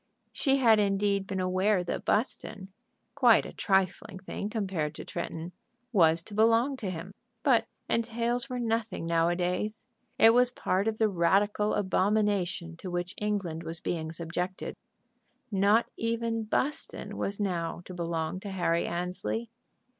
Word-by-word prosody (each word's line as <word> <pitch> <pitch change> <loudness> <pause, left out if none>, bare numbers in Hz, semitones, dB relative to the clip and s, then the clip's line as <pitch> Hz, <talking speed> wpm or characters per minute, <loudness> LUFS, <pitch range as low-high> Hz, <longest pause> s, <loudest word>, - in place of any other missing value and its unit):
She 270 -1 +2
had 225 -5 +5
indeed 200 -1 +1
been 190 -1 -3
aware 185 +1 +2
that 175 - -4
Buston, 200 -4 -1 0.4
quite 245 -5 +5
a - - -8
trifling 190 -1 0
thing 195 +2 -5
compared 190 -9 -2
to - - -7
Tretton, 165 +2 -5 0.4
was 165 -6 +4
to 210 - -9
belong 230 +5 +3
to 205 -6 -4
him. 180 +2 -6 0.3
But 230 -5 +4 0.2
entails 235 +2 -1
were 250 - -3
nothing 225 -6 -1
nowadays. 175 +5 0 0.3
It 225 - +8
was 245 +1 +5
part 200 -4 -1
of 220 -1 0
the 220 - +3
radical 200 +3 +2
abomination 190 -3 +1
to 185 - -7
which 175 +1 -3
England 200 -6 -2
was 165 0 -1
being 160 -2 -3
subjected. 170 +3 -4 0.8
Not 205 +3 +4
even 230 0 -1
Buston 270 +7 -2
was 200 +1 -2
now 175 -4 -2
to 185 - -8
belong 170 0 -2
to 200 - -7
Harry 175 -3 0
Annesley. 180 +6 -3
195 Hz, 140 wpm, -29 LUFS, 175-225 Hz, 0.8 s, It